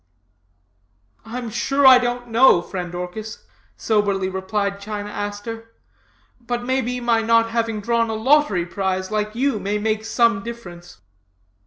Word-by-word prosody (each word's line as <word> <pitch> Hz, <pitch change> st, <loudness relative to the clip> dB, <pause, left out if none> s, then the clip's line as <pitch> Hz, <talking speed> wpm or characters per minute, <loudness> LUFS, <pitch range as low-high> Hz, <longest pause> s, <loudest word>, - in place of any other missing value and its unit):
"I'm 235 Hz, 0 st, -6 dB
sure 275 Hz, +5 st, +1 dB
I 260 Hz, -1 st, +9 dB
don't 245 Hz, 0 st, -3 dB
know, 230 Hz, -6 st, +5 dB
friend 180 Hz, -2 st, -6 dB
Orchis,' 195 Hz, +5 st, -7 dB, 0.3 s
soberly 200 Hz, -3 st, 0 dB
replied 200 Hz, +1 st, -2 dB
China 205 Hz, 0 st, -5 dB
Aster, 225 Hz, +3 st, -6 dB, 0.6 s
'but 240 Hz, 0 st, -4 dB
may 260 Hz, +1 st, +1 dB
be 250 Hz, +1 st, -3 dB
my 235 Hz, -2 st, +1 dB
not 230 Hz, 0 st, +3 dB
having 225 Hz, -2 st, -1 dB
drawn 230 Hz, +1 st, +1 dB
a 220 Hz, -, -2 dB
lottery 225 Hz, -, +2 dB
prize, 190 Hz, +1 st, -3 dB
like 215 Hz, 0 st, -2 dB
you, 260 Hz, -2 st, 0 dB
may 200 Hz, +2 st, -2 dB
make 215 Hz, +1 st, -1 dB
some 230 Hz, 0 st, +2 dB
difference.' 180 Hz, -, -10 dB
220 Hz, 140 wpm, -21 LUFS, 200-235 Hz, 0.6 s, I